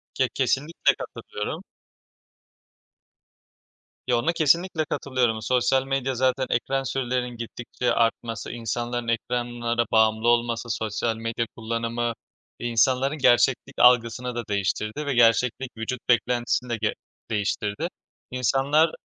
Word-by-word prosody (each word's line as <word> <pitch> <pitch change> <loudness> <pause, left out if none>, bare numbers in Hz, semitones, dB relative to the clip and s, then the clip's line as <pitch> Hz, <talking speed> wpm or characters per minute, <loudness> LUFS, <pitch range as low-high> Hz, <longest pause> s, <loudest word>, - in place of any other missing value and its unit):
Ke 130 -2 +2
kesinlikle 135 +5 +1
katılıyorum. 105 - -6 2.4
Yo, 125 -1 +3
ona 145 +8 +1
kesinlikle 165 +1 +2
katılıyorum. 125 -7 0
Sosyal 130 +2 +2
medya 135 -1 -1
zaten 130 +1 +1
ekran 135 +3 0
sürelerinin 125 -2 -2
gittikçe 120 +1 -3
artması, 115 -1 -1
insanların 120 +1 -3
ekranlara 120 0 -1
bağımlı 110 +1 +3
olması, 120 0 +1
sosyal 110 +1 -1
medya 115 +1 -2
kullanımı 115 +1 -2 0.5
insanların 130 +5 +2
gerçeklik 130 +1 +3
algısını 125 0 +4
da 120 - -2
değiştirdi 105 +7 -1
ve 140 - 0
gerçeklik 120 +1 +2
vücut 115 +3 -3
beklentisini 120 +1 +1
de 115 - -1
ge 105 - +1 0.4
değiştirdi. 105 +6 -1 0.4
İnsanlar 135 +5 +2
120 Hz, 105 wpm, -25 LUFS, 115-130 Hz, 2.4 s, algısını